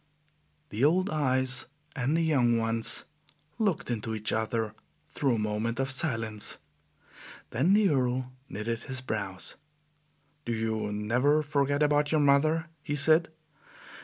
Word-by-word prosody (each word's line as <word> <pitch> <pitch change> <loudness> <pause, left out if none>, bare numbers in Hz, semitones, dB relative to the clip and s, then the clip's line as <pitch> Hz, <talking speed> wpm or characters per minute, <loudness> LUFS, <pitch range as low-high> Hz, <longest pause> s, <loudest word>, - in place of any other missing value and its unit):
The 110 +3 -2
old 185 +7 +3
eyes 130 -3 0 0.3
and 140 +3 +1
the 165 - +2
young 125 -7 +3
ones 115 0 0 0.5
looked 195 - 0
into 110 -1 -3
each 110 0 -1
other 110 0 -1 0.4
through 135 -4 +1
a - - -1
moment 110 +3 -2
of 135 0 0
silence. 115 -7 -1 0.9
Then 155 - +3
the 210 -2 +4
Earl 130 -2 0 0.2
knitted 115 +3 -3
his 130 +1 -4
brows. 100 -6 -4 0.9
"Do 120 - -2
you 110 -1 -1
NEVER 125 +9 +2
forget 145 0 +1
about 145 0 +2
your 155 -2 +3
mother?" 155 +3 +3 0.2
he 145 - -3
said. 155 +3 +4
130 Hz, 130 wpm, -29 LUFS, 115-150 Hz, 0.9 s, the